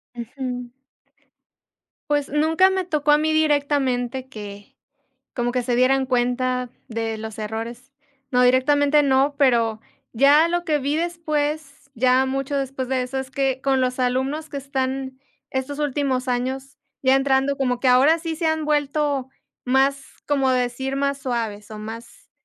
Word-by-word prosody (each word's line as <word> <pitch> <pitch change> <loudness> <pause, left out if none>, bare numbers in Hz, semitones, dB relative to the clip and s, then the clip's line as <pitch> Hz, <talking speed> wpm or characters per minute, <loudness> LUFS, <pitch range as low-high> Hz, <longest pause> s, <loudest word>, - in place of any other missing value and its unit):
Ujú. 245 0 -6 1.4
Pues, 290 -1 +1
nunca 320 +6 +3
me 380 -1 0
tocó 300 -4 +1
a 295 - +6
mí 310 +1 0
directamente 280 -5 +1
que 205 -4 -10 0.6
como 240 -1 -1
que 250 0 0
se 240 0 0
dieran 265 +2 +3
cuenta 250 0 0 0.2
de 225 -1 -3
los 220 0 -7
errores. 230 +4 -6 0.4
No, 250 - +2
directamente 285 +4 +4
no, 275 +1 +2
pero 235 -6 +2 0.4
ya 285 +6 +5
lo 350 0 -1
que 310 -4 +1
vi 285 +2 -1
después, 310 -4 -3
ya 255 +1 +3
mucho 270 +1 -2
después 270 -1 -3
de 260 -1 0
eso, 255 +2 -4
es 265 0 -5
que 270 -1 -1
con 265 -1 +1
los 255 0 -1
alumnos 265 +5 -1
que 285 - -7
están 265 -1 -3 0.3
estos 265 +2 -3
últimos 275 -3 -1
años 260 +2 -3 0.2
ya 260 0 +4
entrando 270 0 +2
como 250 -2 0
que 255 - +1
ahora 270 +6 +5
sí 325 -1 -4
se 330 0 -1
han 315 -1 0
vuelto 290 -2 0 0.4
más 270 +2 +2 0.2
como 275 -2 +2
decir, 255 +2 -1
más 280 0 0
suaves 225 -6 -4
o 215 - -7
más 225 +2 -10
265 Hz, 150 wpm, -22 LUFS, 250-290 Hz, 1.4 s, a